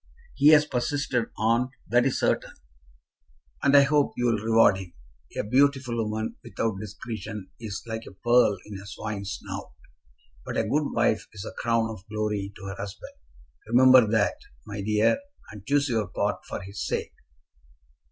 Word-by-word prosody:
"He 145 - +3
has 150 -1 +8
persisted, 135 -2 -1
aunt; 115 +3 +2 0.2
that 120 +4 +3
is 135 - -1
certain." - - 0 1.1
"And 140 +1 +5
I 140 - +8
hope 145 0 +2
you'll 120 -3 +1
reward 110 -2 +4
him. 90 -3 -9 0.4
A - - 0
beautiful 130 +1 +2
woman 110 -1 -2
without 110 -4 -2
discretion 105 -1 -7
is 110 -3 -6
like 110 0 -5
a - - -9
pearl 120 +1 +3
in 105 -2 -8
a 100 - -11
swine's 100 -1 -5
snout; - - -7 0.7
but - - -5
a - - +2
good 150 0 0
wife 115 -2 +1
is 105 0 -7
a - - -6
crown 115 -1 +1
of 105 -4 -9
glory 105 -2 -2
to 95 - -10
her 95 0 -5
husband. 100 -1 -7 0.5
Remember 125 0 +7
that, 105 -1 +1 0.3
my 100 0 -5
dear, 105 - +2 0.3
and 105 0 -12
choose 145 +1 +2
your 110 -5 0
part - - -2
for - - -4
his 100 +1 -6
sake." - - -3
110 Hz, 160 wpm, -26 LUFS, 105-125 Hz, 1.1 s, has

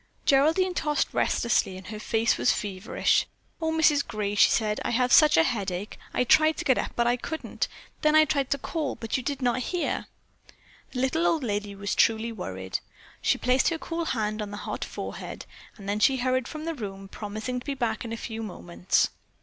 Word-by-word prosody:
Geraldine 320 +7 +4
tossed 300 -3 0
restlessly 205 -5 +1
and 190 - -11
her 210 +1 -7
face 225 +2 +1
was - - +3
feverish. 195 0 0 0.3
"Oh, 320 0 0
Mrs. 315 -3 +4
Gray," 210 -3 -2
she 205 - +6
said, 215 -2 0
"I - - -1
have 250 +1 +2
such 305 - +7
a 160 - +7
headache. 195 -2 -2 0.2
I - - +1
tried 315 +4 +4
to - - -4
get 260 - +3
up, - - -3
but 235 - +2
I 240 +1 +2
couldn't. 315 +6 -3 0.3
Then 305 0 +3
I 310 0 +7
tried 280 -3 0
to 280 - +1
call, 300 0 -3
but 225 -1 -4
you 260 - 0
did 275 +1 -3
not 245 +1 +2
hear." 345 +7 -2 0.9
The 250 - -2
little 320 +6 +2
old 320 -4 +1
lady 205 -3 -2
was 200 +1 -3
truly 225 +1 +2
worried. 95 - -4 0.4
She - - +2
placed 250 +2 +3
her 330 - -2
cool 330 +1 -4
hand 215 -5 -1
on 210 - -4
the 205 - -6
hot - - -3
forehead, - - -6 0.3
and 200 -2 -10
then 205 +1 0
she 265 +4 +4
hurried 255 0 0
from 310 0 -7
the 330 - -2
room, 195 -7 -7
promising 215 +5 -4
to 245 - -14
be 280 - -1
back 230 -4 -1
in 230 - -6
a 230 - -3
few 225 -1 -5
moments. 90 - 0
240 Hz, 205 wpm, -27 LUFS, 210-285 Hz, 0.9 s, such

